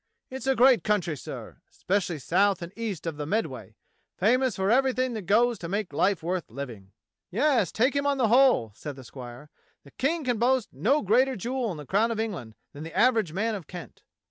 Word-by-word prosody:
It's 265 +1 -6
a 270 - +3
great 255 0 +5
country, 195 -7 0
sir, 135 - -9
expecially 185 -4 -1
south 185 +6 +1
and 170 +3 -8
east 215 -8 -4
of 165 -3 -4
the 150 -1 -4
Med 220 +6 +1
way; - - -10 0.4
famous 255 -2 +2
for 190 +2 0
everything 255 0 +2
that 210 -6 -6
goes 230 +2 +3
to 170 - -6
make 200 -4 -3
life 185 +4 +1
worth 180 +1 -2
living." 115 -6 -8 0.4
"Yes, 235 - +2
take 255 +5 +1
him 280 0 +1
on 280 -1 +1
the 240 -5 +2
whole," 250 - +4
said 145 +6 -7
the 130 - -11
squire, 125 +3 -11 0.3
"the 140 - -17
King 315 +4 -1
can 245 -4 -1
boast 250 0 +1
of - - -18
no 280 +8 +2
greater 255 +6 +3
jewel 245 +3 -2
in 175 - -5
the 150 - -8
crown 210 - +2
of 230 -2 -3
England 175 - -4 0.2
than 145 - -9
the 165 - -8
average 225 -8 +3
man 220 +6 -1
of 190 -7 -6
Kent." 175 -2 -10
210 Hz, 215 wpm, -27 LUFS, 165-250 Hz, 0.4 s, great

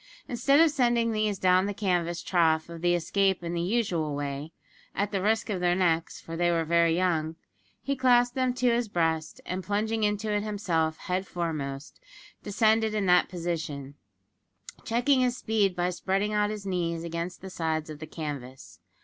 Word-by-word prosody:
Instead 270 +4 +3
of 325 -1 +6
sending 240 -4 +2
these 215 -2 0
down 185 +1 +3
the 205 - -3
canvas 175 -4 -1
trough 160 -3 +2
of 170 -1 -8
the 175 0 +3
escape 190 +2 +1
in 170 0 -3
the 170 - -1
usual 175 -7 0
way 145 +2 -4 0.4
at 200 +1 -1
the 195 -3 -1
risk 220 +3 +1
of 190 - -1
their 175 0 +2
necks, 170 -3 0
for 165 - -8
they 175 +1 +2
were 165 -1 +1
very 170 0 +3
young 165 -3 0 0.5
he 275 - -1
clasped 245 -2 +4
them 255 -1 +1
to 250 -1 +1
his 235 -1 0
breast, 165 -4 -1
and 185 +1 -4
plunging 215 +3 -1
into 210 +1 0
it 205 - +1
himself 175 -7 -1
head 185 +1 -3
foremost, 150 -5 -4 0.4
descended 220 +1 +2
in 205 -2 0
that 180 -1 +4
position, 160 -6 -4 0.9
checking 255 +3 +2
his 250 -1 +1
speed 210 -5 +1
by 180 0 0
spreading 195 +3 -1
out 210 0 +2
his 210 -2 -6
knees 170 -3 -2
against 170 +1 -5
the 190 0 -8
sides 160 -2 -2
of 155 -2 -8
the 155 - -7
canvas. 140 -5 -7
185 Hz, 180 wpm, -27 LUFS, 165-215 Hz, 0.9 s, of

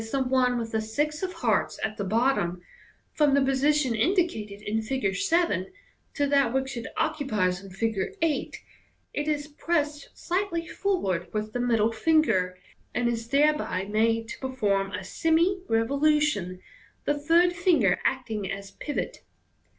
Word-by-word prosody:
the 270 -1 +1
one 250 -1 +2
with 225 -1 -4
the 220 - 0
six 295 +8 -2
of 375 -1 -2
hearts 245 - 0
at 215 0 -1
the 205 - -3
bottom) 205 -4 +1 0.5
from 290 -2 +3
the 280 - +4
position 270 0 +2
indicated 225 - 0
in 220 +1 -1
Fig. 220 -4 -1
7 205 - +1 0.4
to 285 - +1
that 275 -4 +3
which 265 +1 -1
it 235 - -5
occu 300 -3 -1
pies 185 -3 0
in 195 - -10
Fig. 205 - -2
8, 325 -3 -1 0.5
it 295 +1 -2
is 295 -1 -1
pressed 300 -1 -2
slightly 350 -2 -2
forward 195 - -1
with 215 0 -3
the 245 - -2
middle 230 -2 +2
finger, 220 - +2 0.4
ard 245 - 0
is 230 -1 -2
thereby 285 -9 +2
made 225 +2 +1
to - - -7
perform 205 -7 0
a - - -4
semi 335 +4 +1
revolution, 230 - +1 0.4
the 290 - +2
third 335 +5 +3
finger 345 - +3
MODERN 180 - 0
MAGIC. - - -20
19 - - +4 0.3
acting - - -3
as 195 0 -6
pivot. 295 - -4
260 Hz, 160 wpm, -27 LUFS, 215-300 Hz, 0.5 s, the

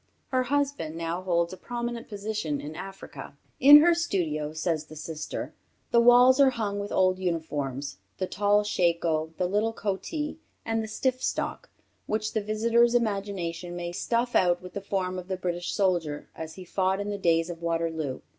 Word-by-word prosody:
Her 255 -1 +2
husband 280 - -1
now 165 +2 -3
holds 170 -1 0
a - - -8
prominent 240 +3 -5
position 205 -8 -3
in 150 +2 -7
Africa. 195 +2 -9 0.2
In 290 +3 +10
her 340 +2 +5
studio, 165 - -1
says 160 -1 -2
her 155 - -10
sister, 155 0 -5 0.4
"the 235 - +5
walls 245 +2 +7
are 275 -1 +7
hung 210 -5 -2
with 200 0 -5
old 185 0 +2
uniforms 145 - -3 0.2
the 185 - -1
tall 205 +2 +2
shako, 170 -5 +1
the 180 - +1
little 210 +5 +1
coatee, 295 - -3 0.3
and 225 0 0
the 220 - -4
stiff 255 +4 -1
stock - - -2 0.4
which 215 0 -1
the 220 - 0
visitor's 230 +3 +2
imagination 195 -6 -2
may 175 0 -4
stuff 235 +6 -1
out 175 -1 +4
with 180 0 -11
the 200 - -4
form 185 -2 -2
of 180 - -9
the 190 -1 -2
British 175 -1 -3
soldier 175 -7 0
as 160 0 -7
he 185 - -9
fought 190 +2 0
in 205 +1 -3
the 200 - -4
days 165 -1 +2
of 170 -1 -9
Waterloo. 165 -4 -2
190 Hz, 175 wpm, -27 LUFS, 170-225 Hz, 0.4 s, In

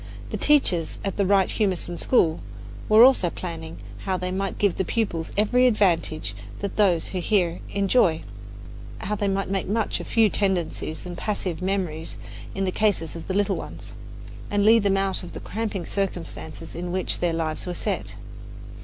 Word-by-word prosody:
The - - -2
teachers 225 - +2
at 195 - -2
the 200 -2 +2
Wright 195 -1 +4
Humason 185 -4 -1
School 165 -10 +3 0.5
were 215 +2 +8
always 260 -5 +6
planning 165 -2 -6 0.3
how 190 -2 0
they 180 0 -3
might 195 +1 -2
give 200 -3 +1
the - - +1
pupils 175 -5 -2
every 250 +5 +4
advantage 170 - +1 0.3
that 200 -1 -3
those 185 -6 +3
who 185 - -3
hear 175 -2 +1
enjoy 195 -4 +2 0.8
how 210 - -2
they 205 -1 0
might 195 0 0
make 195 -1 -1
much 215 +3 0
of - - -7
few 225 -1 +4
tendencies 185 -5 -1
and 175 -1 -6
passive 185 -5 -3
memories 180 -4 -2 0.4
in 195 - -1
the 185 - 0
cases 195 -6 0
of 165 - -8
the 190 - -2
little 205 -1 +1
ones - - -8 0.6
and 205 0 +1
lead 225 +1 +7
them 195 -1 +2
out 195 -1 0
of 175 - -9
the - - -6
cramping 210 -5 -4
circumstances 175 -4 -4
in 175 +1 -4
which 185 0 0
their 175 -1 +1
lives 160 +1 -2
were 180 - -3
set. - - -3
190 Hz, 175 wpm, -25 LUFS, 175-205 Hz, 0.8 s, were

